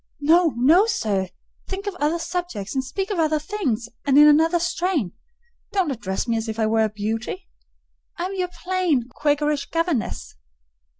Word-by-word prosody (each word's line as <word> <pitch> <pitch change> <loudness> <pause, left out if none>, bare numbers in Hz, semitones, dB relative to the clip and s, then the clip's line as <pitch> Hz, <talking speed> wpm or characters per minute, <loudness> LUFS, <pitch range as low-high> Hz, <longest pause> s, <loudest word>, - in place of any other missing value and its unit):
"No, 325 +2 +4
no, 325 - +5
sir! 200 - -1 0.4
think 390 +1 -5
of 405 - -2
other 300 +3 +1
subjects, 340 - -4
and 265 -1 0
speak 385 +10 -4
of 385 - -1
other 310 -1 +2
things, 295 - -2 0.2
and 280 -1 +3
in 295 +1 +9
another 320 +3 +5
strain. 340 - -1 0.6
Don't 375 -7 +1
address 205 -4 -3
me 230 -1 +1
as 225 0 -3
if 220 - -4
I 220 - +1
were 220 0 +2
a - - -1
beauty; 220 - -4 0.7
I 345 - -2
am 380 - -4
your 365 -2 -2 0.2
plain, 355 -10 +1
Quakerish 295 +1 0
governess." 330 - -2
300 Hz, 170 wpm, -23 LUFS, 230-355 Hz, 0.7 s, in